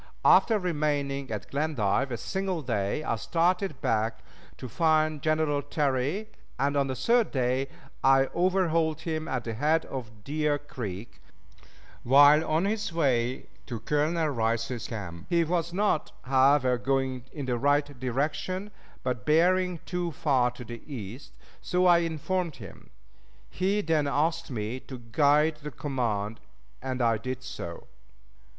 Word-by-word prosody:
After 225 - +6
remaining 145 -6 -1
at 105 -4 -5
Glendive 135 -4 0
a 120 - -2
single 185 - -3
day, 110 +3 -1
I 115 - -1
started 175 - 0
back 110 +1 0 0.3
to 130 - -7
find 155 +3 +2
General 155 -1 +1
Terry, 145 +7 -1 0.3
and 140 +2 0
on 140 -1 +2
the 130 - -3
third 230 - +2
day 130 0 0 0.4
I 135 0 +5
overhauled 170 -3 +1
him 160 -1 -3
at 130 -3 -2
the 115 - -4
head 150 +7 +1
of 110 -6 -8
Deer 150 +2 0
Creek, 115 -8 -7 0.8
while 145 +4 +7
on 160 +3 +1
his 210 -1 -1
way 130 -6 0 0.2
to 120 -3 -4
Colonel 155 +5 +1
Rice's 115 -1 -1
camp. 95 -6 -7
He 170 -1 +3
was 170 0 -1
not, 195 -3 0
however, 130 -1 +3
going 130 -1 -1
in 145 -4 -5
the 125 -2 -1
right 145 +2 +3
direction, 150 - -2 0.3
but 125 -4 -2
bearing 180 - +3
too 175 -2 -2
far 130 -4 +2
to 125 0 -10
the 120 0 -8
east, 120 +1 -7
and - - -26 0.2
so 180 0 +1
I 175 -1 +6
informed 170 0 -2
him. 100 -6 -12 0.6
He 195 +3 0
then 160 -5 +1
asked 160 +3 0
me 115 0 -3
to 130 0 -9
guide 145 +6 +2
the 150 - -5
command, 115 -7 -2 0.4
and 130 -1 -2
I 115 -2 +2
did 130 +2 -5
so. 85 -8 -7
145 Hz, 145 wpm, -28 LUFS, 125-160 Hz, 0.8 s, while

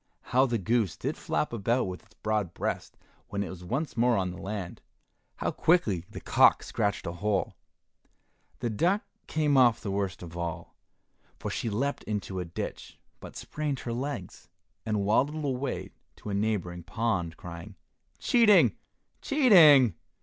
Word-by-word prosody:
How 130 +2 +5
the 120 -2 0
goose 110 -1 0
did - - -3
flap - - -2
about 115 +3 +1
with 90 -1 -5
its 110 0 -26
broad 105 -5 -2
breast - - -3 0.3
when 100 0 -2
it 95 - -6
was 90 -1 -10
once 135 - -3
more 120 +1 +3
on 90 -2 -1
the 90 - -9
land! 95 -3 -5 0.5
How - - -2
quickly 110 - +2
the - - -8
cock - - +4
scratched 100 -2 -1
a 85 - -2
hole! 100 +3 -1 1.1
The 120 -2 -1
duck 180 - +1 0.2
came 150 -3 +2
off 120 -4 +5
the 100 - -4
worst 95 -2 -2
of 85 -1 -9
all, 85 -2 -5 0.6
for - - -5
she 115 - -2
leapt 135 +7 -2
into 100 -3 -3
a 90 - -3
ditch, 85 - -6 0.2
but - - -11
sprained 150 -3 -4
her 120 - -4
legs, 125 -7 -5 0.4
and 105 -2 0
waddled 145 +9 +1
away 130 -1 -3 0.2
to 105 - -7
a - - -2
neighboring 100 -4 -1
pond, 95 -5 -2
crying, 85 -1 -9 0.4
"Cheating, 230 -4 +5 0.5
cheating!" 165 - +7
110 Hz, 155 wpm, -28 LUFS, 95-135 Hz, 1.1 s, cheating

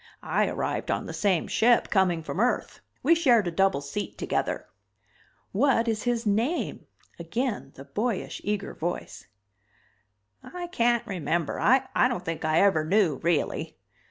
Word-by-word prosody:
I - - +1
arrived - - -3
on - - -1
the - - -6
same 190 -5 +1
ship, 235 +1 +3
coming 180 -5 +2
from 170 - -5
Earth, 245 +3 0 0.2
we 320 - +5
shared 250 - +4
a - - -1
double 190 -3 +2
seat 145 +9 -5
together." - - -2 0.9
"What 235 +1 +2
is 220 -2 0
his 240 -1 0
name?" 225 +11 -1 0.3
Again 205 - -3
the 135 - -11
boyish, 210 - -3
eager 205 0 -2
voice. 175 +2 -5 1.1
"I 360 -1 -7
can't 240 -9 +1
remember. 170 -3 -2
I 260 +1 +4 0.2
don't 245 - -4
think 165 -1 -4
I 155 +1 +3
ever 190 -6 +4
knew, 170 -3 +2
really." 165 -1 -1
205 Hz, 145 wpm, -27 LUFS, 170-240 Hz, 1.1 s, we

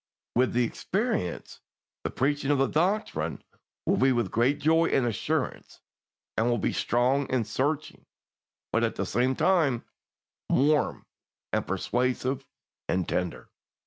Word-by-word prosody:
With 125 +1 +3
the 125 +1 +3
experience, 190 - -2 0.4
the - - -1
preaching 140 +1 0
of 145 - +4
the 135 - +3
doctrine 160 - 0 0.4
will - - +2
be 135 +1 +4
with 120 -6 0
great 125 +6 +2
joy 160 +3 +3
and 130 - +2
assurance, 115 -4 -2 0.6
and 115 +2 +2
will 120 - +2
be - - 0
strong 130 +3 +1
and 125 -3 +1
searching, 140 +8 -2 0.7
but - - +2
at - - 0
the - - -2
same 130 +2 +1
time 155 -10 +2 0.6
warm 145 +3 +2 0.5
and - - 0
persuasive 125 +6 -1 0.4
and 90 -2 0
tender. 90 -1 -2
130 Hz, 135 wpm, -28 LUFS, 120-145 Hz, 0.7 s, of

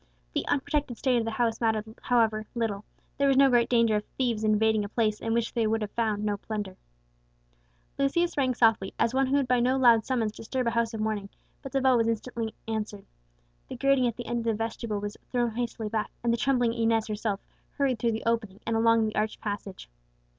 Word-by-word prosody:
The - - -2
unprotected 285 -3 -1
state 255 -2 +2
of 230 - 0
the - - -1
house 225 0 -1
mattered, 220 -2 +1 0.2
however, 225 -3 +1
little; 215 -4 -2 0.4
there 280 - +3
was 270 -1 +3
no 275 -1 +6
great 240 -1 +3
danger 230 -3 +3
of 210 - -3
thieves 235 -4 0
invading 215 0 +3
a 205 - -5
place 215 -2 0
in 225 - -3
which 230 0 0
they 230 -3 +1
would 220 -1 0
find 215 -3 -1
no 205 -1 0
plunder. 205 -2 -5 1.2
Lucius 340 +6 +1
rang 260 -3 +1
softly, 225 -5 +2
as 230 - +1
one 265 0 +2
who 270 - +1
would 280 -2 +2
by 250 0 +3
no 255 +2 +2
loud 235 -4 +5
summons 230 -4 0
disturb 250 +4 -3
a 235 - +1
house 230 -1 0
of 215 - -3
mourning; 215 -2 -2 0.3
but 270 - -8
the 270 - +1
bell 260 -1 +4
was 230 -1 +2
instantly 230 0 -3
answered. 215 -2 -4 0.6
The - - -7
grating 275 -2 +3
at 235 - -2
the 245 - -6
end 240 0 -2
of 230 - -5
the 225 -1 +1
vestibule 225 -1 -3
was 205 +1 -5
thrown 240 -2 +1
hastily 230 -1 -3
back, 215 0 -2
and 235 -1 +2
the - - +1
trembling 245 -3 +2
Inez 225 -1 +1
herself 210 -2 -2 0.4
hurried 265 -5 +1
through 230 0 +1
the 220 - -4
opening, 220 -4 -1
and 230 - 0
along 230 0 +4
the 215 - -3
arched 215 0 -1
passage. 205 -2 -6
230 Hz, 220 wpm, -27 LUFS, 215-245 Hz, 1.2 s, no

